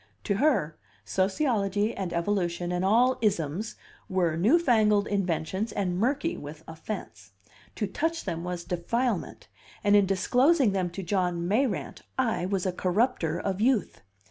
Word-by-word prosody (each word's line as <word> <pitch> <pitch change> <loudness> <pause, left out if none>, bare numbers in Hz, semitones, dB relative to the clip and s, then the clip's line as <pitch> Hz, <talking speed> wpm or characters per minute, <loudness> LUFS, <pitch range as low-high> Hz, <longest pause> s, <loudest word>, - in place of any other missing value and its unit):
To 200 -3 0
her, 215 - +1 0.3
sociology 205 0 0
and 190 -3 -3
evolution 175 -1 -1
and 180 0 -1
all 240 +6 +3
"isms" 195 0 -1 0.3
were 175 -4 +1
new 215 - +4
fangled 215 -10 +3
inventions 190 +1 -1
and 185 -4 -1
murky 280 - 0
with 150 +2 -9
offense; 160 - -7 0.4
to 210 - -1
touch 325 - -2
them 165 0 -3
was 180 -1 -4
defilement, 215 +6 -2 0.4
and 205 0 +4
in 200 -2 +5
disclosing 250 - +3
them 185 -2 -1
to 190 +3 -6
John 180 -2 0
Mayrant 210 - -1 0.2
I 225 -8 0
was 195 -1 -1
a 185 - +1
corrupter 180 -2 0
of 195 +1 -2
youth. 240 -2 +1
195 Hz, 145 wpm, -27 LUFS, 175-230 Hz, 0.4 s, in